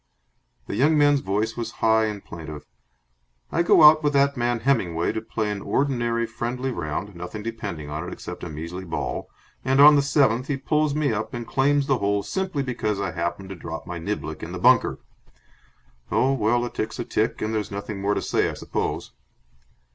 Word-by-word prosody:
The -, -, -4 dB
young 150 Hz, +4 st, +3 dB
man's 145 Hz, -1 st, +5 dB
voice 105 Hz, +1 st, -1 dB
was 115 Hz, -1 st, -4 dB
high 110 Hz, 0 st, +3 dB
and 105 Hz, -2 st, -5 dB
plaintive. 75 Hz, -3 st, -8 dB, 0.9 s
"I -, -, +2 dB
go 170 Hz, -, +5 dB
out 155 Hz, +1 st, +9 dB
with 145 Hz, -1 st, +1 dB
that 140 Hz, 0 st, +3 dB
man 120 Hz, -2 st, 0 dB
Hemmingway 95 Hz, -10 st, +1 dB
to 110 Hz, -, -3 dB
play 105 Hz, -1 st, -2 dB
an 100 Hz, -1 st, -4 dB
ordinary 120 Hz, -4 st, 0 dB
friendly 120 Hz, +3 st, -3 dB
round 85 Hz, +1 st, -4 dB
nothing 90 Hz, +5 st, -7 dB
depending 100 Hz, -10 st, -5 dB
on 80 Hz, +4 st, -4 dB
it -, -, -6 dB
except 90 Hz, 0 st, -8 dB
a 90 Hz, -, -4 dB
measly 85 Hz, +4 st, -6 dB
ball 85 Hz, -3 st, -4 dB, 0.3 s
and 130 Hz, +1 st, +2 dB
on 150 Hz, +1 st, +9 dB
the 140 Hz, -, +4 dB
seventh 135 Hz, -3 st, +2 dB
he 140 Hz, -, -1 dB
pulls 150 Hz, +1 st, +1 dB
me 150 Hz, -5 st, +1 dB
up 110 Hz, +2 st, -3 dB
and 120 Hz, -1 st, -5 dB
claims 140 Hz, +3 st, +2 dB
the 135 Hz, -2 st, +1 dB
hole 100 Hz, 0 st, 0 dB
simply 185 Hz, -, -2 dB
because 110 Hz, -5 st, -2 dB
I -, -, -2 dB
happened 85 Hz, +2 st, -3 dB
to 95 Hz, -, -6 dB
drop 80 Hz, -1 st, -7 dB
my 90 Hz, -1 st, -5 dB
niblick 80 Hz, -, -4 dB
in -, -, -6 dB
the -, -, -4 dB
bunker. -, -, +4 dB, 1.1 s
Oh, 135 Hz, +1 st, +3 dB
well, 120 Hz, 0 st, +1 dB
a 120 Hz, -, -5 dB
tick's 110 Hz, -, -4 dB
a 120 Hz, -, -3 dB
tick, 110 Hz, +2 st, 0 dB
and 110 Hz, +1 st, -2 dB
there's 105 Hz, -2 st, -2 dB
nothing 100 Hz, 0 st, -5 dB
more 100 Hz, +1 st, +1 dB
to -, -, -2 dB
say, -, -, +1 dB
I -, -, -5 dB
suppose." -, -, -3 dB
115 Hz, 200 wpm, -24 LUFS, 100-135 Hz, 1.1 s, out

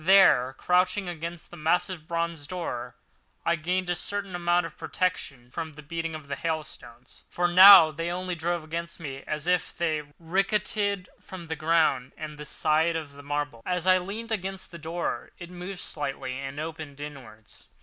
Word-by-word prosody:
There, 160 Hz, -9 st, +6 dB
crouching 180 Hz, +2 st, +2 dB
against 170 Hz, 0 st, -6 dB
the 175 Hz, -, -10 dB
massive 165 Hz, +1 st, 0 dB
bronze 170 Hz, -3 st, -2 dB
door, 125 Hz, -8 st, -4 dB, 0.5 s
I 170 Hz, -, +3 dB
gained 180 Hz, +3 st, -1 dB
a 175 Hz, -, +1 dB
certain 200 Hz, +1 st, -3 dB
amount 175 Hz, 0 st, +2 dB
of -, -, -8 dB
protection 135 Hz, -9 st, -2 dB
from 160 Hz, +3 st, -5 dB
the 155 Hz, +1 st, -12 dB
beating 165 Hz, +1 st, -4 dB
of 155 Hz, -2 st, -9 dB
the 140 Hz, -, -3 dB
hailstones, 135 Hz, -6 st, -6 dB
for 175 Hz, 0 st, +1 dB
now 180 Hz, -2 st, +10 dB
they 165 Hz, +2 st, -3 dB
only 180 Hz, +1 st, -2 dB
drove 170 Hz, 0 st, -1 dB
against 170 Hz, +2 st, -5 dB
me 135 Hz, -4 st, -6 dB
as 150 Hz, 0 st, -2 dB
they 170 Hz, -3 st, 0 dB, 0.2 s
ricocheted 195 Hz, +2 st, 0 dB
from 175 Hz, -3 st, -10 dB
the 160 Hz, -, -1 dB
ground 155 Hz, -5 st, +2 dB
and 150 Hz, -1 st, -7 dB
the 150 Hz, -, -6 dB
side 160 Hz, +3 st, +2 dB
of 155 Hz, -3 st, -4 dB
the 140 Hz, -, -11 dB
marble. 145 Hz, -4 st, -3 dB
As 180 Hz, -1 st, -1 dB
I 185 Hz, 0 st, +6 dB
leaned 215 Hz, +5 st, -6 dB
against 195 Hz, -2 st, -3 dB
the 170 Hz, -, -9 dB
door, 165 Hz, +3 st, -4 dB
it 175 Hz, 0 st, -9 dB
moved 180 Hz, +1 st, -6 dB
slightly 135 Hz, -3 st, -4 dB
and 135 Hz, +2 st, -5 dB
opened 155 Hz, -3 st, -6 dB
inwards. 120 Hz, -8 st, -10 dB
165 Hz, 170 wpm, -27 LUFS, 150-180 Hz, 0.5 s, now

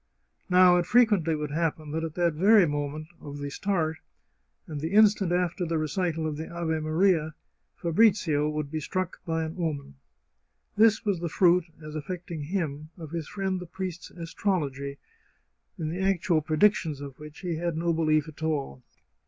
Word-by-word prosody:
Now, 180 Hz, -1 st, +7 dB
it 175 Hz, -1 st, 0 dB
frequently 205 Hz, -9 st, +4 dB
would 150 Hz, -1 st, -4 dB
happen 155 Hz, -1 st, -1 dB
that 160 Hz, +1 st, -2 dB
at 160 Hz, -1 st, -4 dB
the 175 Hz, -1 st, +2 dB
very 195 Hz, +5 st, +5 dB
moment 145 Hz, +1 st, -3 dB
of 145 Hz, 0 st, -8 dB
the 145 Hz, 0 st, -5 dB
start, 160 Hz, -3 st, -1 dB, 0.7 s
and 150 Hz, -3 st, -6 dB
the 160 Hz, +4 st, -3 dB
instant 210 Hz, -3 st, +5 dB
after 180 Hz, +1 st, 0 dB
the 165 Hz, -1 st, -1 dB
recital 160 Hz, +1 st, -1 dB
of 155 Hz, -2 st, -2 dB
the 160 Hz, -, -6 dB
Ave 170 Hz, -2 st, -2 dB
Maria, 160 Hz, 0 st, +2 dB, 0.4 s
Fabrizio 170 Hz, -5 st, +3 dB
would 150 Hz, -1 st, -3 dB
be 160 Hz, -, -2 dB
struck 185 Hz, +4 st, -3 dB
by 165 Hz, 0 st, 0 dB
an 160 Hz, +3 st, -5 dB
omen. 150 Hz, -, -3 dB, 0.8 s
This 220 Hz, +1 st, +4 dB
was 200 Hz, -4 st, +1 dB
the 170 Hz, 0 st, -3 dB
fruit, 180 Hz, 0 st, +4 dB, 0.2 s
as 155 Hz, 0 st, -8 dB
affecting 170 Hz, +1 st, -5 dB
him, 155 Hz, -4 st, -3 dB
of 160 Hz, -3 st, -9 dB
his 165 Hz, -3 st, -4 dB
friend 190 Hz, -2 st, -2 dB
the 180 Hz, -, -8 dB
priest's 180 Hz, 0 st, -6 dB
astrology, 150 Hz, -6 st, -3 dB, 0.8 s
in 160 Hz, -3 st, -3 dB
the 175 Hz, +4 st, -3 dB
actual 185 Hz, -4 st, +2 dB
predictions 155 Hz, -1 st, +2 dB
of 140 Hz, -2 st, -9 dB
which 150 Hz, 0 st, -11 dB
he 175 Hz, -4 st, -2 dB
had 170 Hz, -1 st, -2 dB
no 170 Hz, +1 st, +1 dB
belief 155 Hz, -1 st, +2 dB
at 155 Hz, 0 st, -12 dB
all. 145 Hz, -, -2 dB
165 Hz, 170 wpm, -27 LUFS, 155-180 Hz, 0.8 s, Now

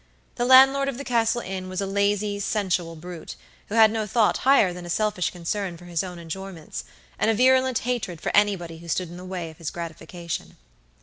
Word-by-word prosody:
The 240 Hz, -, -1 dB
landlord 270 Hz, +2 st, +7 dB
of 260 Hz, -, -5 dB
the 280 Hz, -, -5 dB
Castle 235 Hz, -2 st, +1 dB
Inn 185 Hz, -1 st, -5 dB
was 185 Hz, -, -4 dB
a 200 Hz, -, 0 dB
lazy, 200 Hz, +1 st, 0 dB
sensual 185 Hz, -5 st, -1 dB
brute, 170 Hz, +1 st, -8 dB, 0.3 s
who 210 Hz, -, -3 dB
had 220 Hz, -1 st, +7 dB
no 220 Hz, -1 st, -2 dB
thought 220 Hz, 0 st, +2 dB
higher 255 Hz, -9 st, +4 dB
than 180 Hz, 0 st, -8 dB
a 175 Hz, -, -8 dB
selfish 210 Hz, -1 st, 0 dB
concern 180 Hz, +1 st, -4 dB
for 175 Hz, -, -14 dB
his 175 Hz, -1 st, -2 dB
own 180 Hz, -2 st, -7 dB
enjoyments, 165 Hz, -, -7 dB, 0.3 s
and -, -, +2 dB
a 225 Hz, -, +3 dB
virulent 260 Hz, +1 st, +4 dB
hatred 235 Hz, -9 st, -3 dB
for -, -, -2 dB
anybody 185 Hz, -6 st, +1 dB
who 170 Hz, -, -12 dB
stood 175 Hz, +1 st, -1 dB
in 175 Hz, -, -9 dB
the 180 Hz, -, -9 dB
way 180 Hz, -3 st, -5 dB
of 160 Hz, -, -18 dB
his 165 Hz, -, -3 dB
gratification. 170 Hz, 0 st, -6 dB
190 Hz, 205 wpm, -25 LUFS, 175-220 Hz, 0.3 s, landlord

